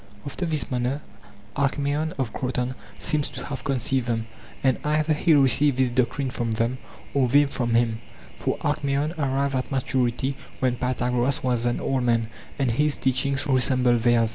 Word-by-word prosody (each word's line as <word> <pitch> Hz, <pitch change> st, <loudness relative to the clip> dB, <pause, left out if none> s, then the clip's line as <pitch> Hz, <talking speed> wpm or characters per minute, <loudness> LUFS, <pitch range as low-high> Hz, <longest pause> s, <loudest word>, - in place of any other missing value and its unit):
After 170 Hz, +5 st, -3 dB
this 155 Hz, -4 st, 0 dB
manner 125 Hz, +3 st, -1 dB, 0.5 s
Alkmaeon 145 Hz, +3 st, 0 dB
of 130 Hz, -5 st, -2 dB
Kroton 125 Hz, 0 st, -2 dB, 0.2 s
seems 150 Hz, -2 st, 0 dB
to -, -, -7 dB
have 140 Hz, -3 st, -5 dB
conceived 130 Hz, -1 st, 0 dB
them, 115 Hz, -2 st, -1 dB, 0.4 s
and 130 Hz, -2 st, +2 dB
either 155 Hz, +1 st, +1 dB
he 155 Hz, +1 st, +3 dB
received 135 Hz, 0 st, +4 dB
this 130 Hz, -2 st, +2 dB
doctrine 130 Hz, +2 st, 0 dB
from 120 Hz, -3 st, -2 dB
them 115 Hz, +3 st, -1 dB, 0.3 s
or 135 Hz, -2 st, +3 dB
they 145 Hz, +4 st, +5 dB
from 120 Hz, -4 st, -1 dB
him; 115 Hz, -1 st, +1 dB, 0.3 s
for -, -, -2 dB
Alkmaeon 140 Hz, +3 st, 0 dB
arrived 140 Hz, 0 st, 0 dB
at 130 Hz, -1 st, -2 dB
maturity 130 Hz, 0 st, 0 dB, 0.2 s
when 125 Hz, -2 st, +1 dB
Pythagoras 125 Hz, +1 st, 0 dB
was 120 Hz, -2 st, +1 dB
an 120 Hz, -, 0 dB
old 135 Hz, -1 st, 0 dB
man, 115 Hz, -2 st, +1 dB, 0.3 s
and 135 Hz, -4 st, +1 dB
his 150 Hz, +5 st, +1 dB
teachings 135 Hz, +2 st, 0 dB
resembled 125 Hz, -3 st, +3 dB
theirs. 115 Hz, -1 st, +3 dB
130 Hz, 165 wpm, -24 LUFS, 120-140 Hz, 0.5 s, they